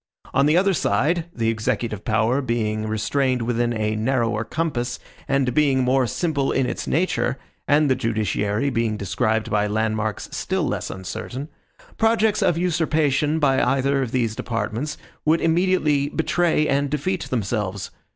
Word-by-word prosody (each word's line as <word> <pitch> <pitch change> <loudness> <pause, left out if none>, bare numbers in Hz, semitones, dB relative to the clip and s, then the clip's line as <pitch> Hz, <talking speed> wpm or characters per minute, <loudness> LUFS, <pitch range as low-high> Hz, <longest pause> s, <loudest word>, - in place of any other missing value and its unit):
On 140 +2 +4
the 155 +3 +4
other 195 +1 +3
side, 165 0 +1
the 115 -7 -1
executive 110 -2 -2
power 115 +4 +1
being 110 -4 -1
restrained 125 +4 0
within 120 0 0
a 110 -1 -1
narrower 115 -1 0
compass, 130 -5 -2 0.3
and 135 -3 +1
being 140 -4 +3
more 130 0 +2
simple 145 -1 -1
in 135 - +1
its - - -4
nature, 165 -4 0 0.3
and 150 +1 +4
the 130 - +4
judiciary 110 +1 -1
being 115 -3 0
described 110 +3 -1
by 105 0 +2
landmarks 110 0 -1
still - - -1
less - - -3
uncertain, 130 - -6 0.5
projects 225 -1 +3
of 165 - +2
usurpation 155 -4 +1
by 135 -4 +3
either 135 +2 +2
of 125 -4 -2
these 115 -4 0
departments 115 +6 -3 0.3
would 160 +2 +3
immediately 160 -4 +2
betray 165 -1 +1
and 140 +1 +1
defeat 165 +6 -2
themselves. 105 -4 -2
130 Hz, 145 wpm, -23 LUFS, 110-150 Hz, 0.5 s, On